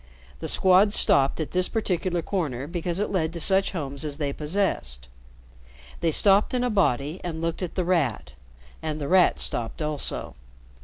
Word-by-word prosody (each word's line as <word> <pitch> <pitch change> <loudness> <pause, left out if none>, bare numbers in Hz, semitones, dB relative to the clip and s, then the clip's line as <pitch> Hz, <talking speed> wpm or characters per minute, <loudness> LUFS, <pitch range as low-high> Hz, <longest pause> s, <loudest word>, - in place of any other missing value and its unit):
The - - -5
Squad 190 +2 +4
stopped 135 -6 +3
at 155 - -3
this 185 0 +1
particular 185 -5 -1
corner 145 -10 -3
because 170 +2 -3
it 210 - -1
led 160 -4 0
to 170 - -5
such 190 +4 +4
homes 140 -4 -4
as 145 -2 -4
they 145 -3 -2
possessed. 150 - -1 0.9
They 170 - +1
stopped 200 - +3
in 250 - 0
a 250 - 0
body 155 - 0
and 165 -3 -4
looked 165 +2 -3
at 180 - -4
The 185 - -1
Rat, 145 - 0 0.5
and 155 -1 -4
The 145 - -4
Rat 185 +1 +4
stopped 115 -2 -3
also. 150 -2 -3
165 Hz, 170 wpm, -25 LUFS, 145-185 Hz, 0.9 s, Squad